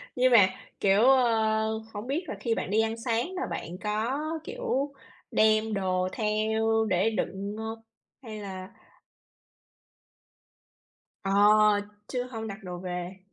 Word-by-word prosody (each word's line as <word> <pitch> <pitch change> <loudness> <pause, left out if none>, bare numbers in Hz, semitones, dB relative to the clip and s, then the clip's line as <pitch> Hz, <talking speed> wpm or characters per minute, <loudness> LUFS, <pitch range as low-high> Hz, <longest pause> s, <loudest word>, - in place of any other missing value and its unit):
nhưng 255 0 +3
mà, 205 -6 +8 0.3
kiểu, 195 +1 +4
ơ, 220 -4 +3
hổng 210 +3 -6
biết 295 +7 -1
là - - -4
khi 230 -2 0
bạn - - -3
đi 220 +2 +4
ăn 225 0 -1
sáng 240 +10 -1
mà 370 - -3
bạn 175 +2 -5
có, 220 +6 -1 0.2
kiểu, 430 - -2 0.4
đem 215 0 +3
đồ 185 -2 0
theo 220 +1 +1
để 185 +4 +2
đựng 200 -1 -3
hông? 220 0 -5 0.4
Hay 215 -3 -7
là 190 -2 -7 2.5
Ờ, 195 - -2 0.8
chứ 250 -1 -2
hông 225 -2 -5
đặt 205 0 -8
đồ 180 -1 -6
về. 180 +1 -5
220 Hz, 135 wpm, -28 LUFS, 195-230 Hz, 2.5 s, mà